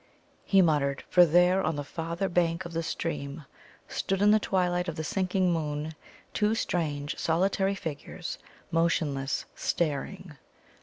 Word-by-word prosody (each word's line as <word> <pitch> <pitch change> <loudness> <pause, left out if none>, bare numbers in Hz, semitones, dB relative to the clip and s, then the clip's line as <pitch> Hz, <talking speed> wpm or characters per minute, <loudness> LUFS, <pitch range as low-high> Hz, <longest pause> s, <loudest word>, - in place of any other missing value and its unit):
he 195 -2 +5
muttered, 140 -4 +1
for 175 -1 +7
there, 180 +4 +4
on 155 -2 0
the 145 - -3
farther 170 +5 -3
bank 170 -2 +1
of 170 - -7
the 165 - 0
stream, 150 -2 -4 0.4
stood 195 0 -1
in 205 +1 +5
the 215 - +5
twilight 180 -3 0
of 170 - -3
the 160 - -3
sinking 185 +1 +1
moon 155 -1 -2 0.4
two 210 +1 +2
strange, 150 -8 -2
solitary 190 +4 +1
figures, 165 +1 -6 0.3
motionless, 150 -5 0
staring. 160 +1 -2
170 Hz, 140 wpm, -28 LUFS, 150-185 Hz, 0.4 s, for